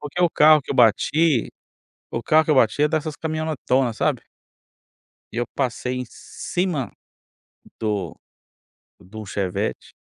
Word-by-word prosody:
Porque 150 +4 -5
o 170 - +4
carro 155 -1 +6
que - - -10
eu - - -5
bati 125 +4 +3 0.6
o 115 - -4
carro 155 +4 +4
que 160 - +1
eu 150 - +3
bati 130 +4 +3
é 150 - +4
dessas 155 -1 -2
caminhonetonas, 155 -6 -1
sabe? - - 0 1.1
E - - -9
eu 120 - 0
passei 125 -1 -2
em 125 - -4
cima 175 -4 -4 0.9
do 105 -6 -2 0.9
de 100 +5 -13
um 110 - -6
Chevette. 95 -1 -3
135 Hz, 145 wpm, -22 LUFS, 115-155 Hz, 1.1 s, carro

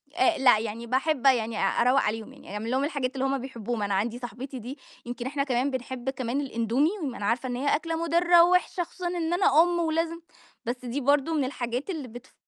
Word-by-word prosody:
أ 360 -1 +3
لأ، 260 -5 +5
يعني 225 +2 -5
باحب 270 +3 0
يعني 230 -4 +3
أروَّق 245 +7 +3
عليهم، 220 +4 -3
يعني 275 -7 -12
أعمل 220 +3 -4
لهم 265 +2 +1
الحاجات 280 -4 -2
اللي 265 0 -1
هُم 270 0 +1
بيحبوهم، 240 -4 -4
أنا 200 -1 -1
عندي 225 +5 -1
صاحبتي 250 +3 -7
دي 250 +5 -7 0.3
يمكن 245 0 -5
إحنا 275 +1 -1
كمان 265 0 0
بنحب 260 0 -4
كمان 260 0 -2
الاندومي، 250 +2 +1
ما 260 -4 -3
أنا 205 - -4
عارفة 240 +4 0
إن 245 - -2
هي 280 +4 +1
أكلة 330 +2 -3
مضرّة 340 +1 +5
ووحشة 360 0 +2
خصوصًا 350 +1 -6
إن 345 -1 -1
أنا 350 -4 +5
أُم 350 0 0
ولازم 330 0 0 0.5
بس 245 +1 -4
دي 250 +4 -3
برضو 285 +4 +2
من 300 -3 +1
الحاجات 250 +2 -3
اللي 310 -8 -4
بتف 245 +2 -12
265 Hz, 210 wpm, -27 LUFS, 240-310 Hz, 0.5 s, لأ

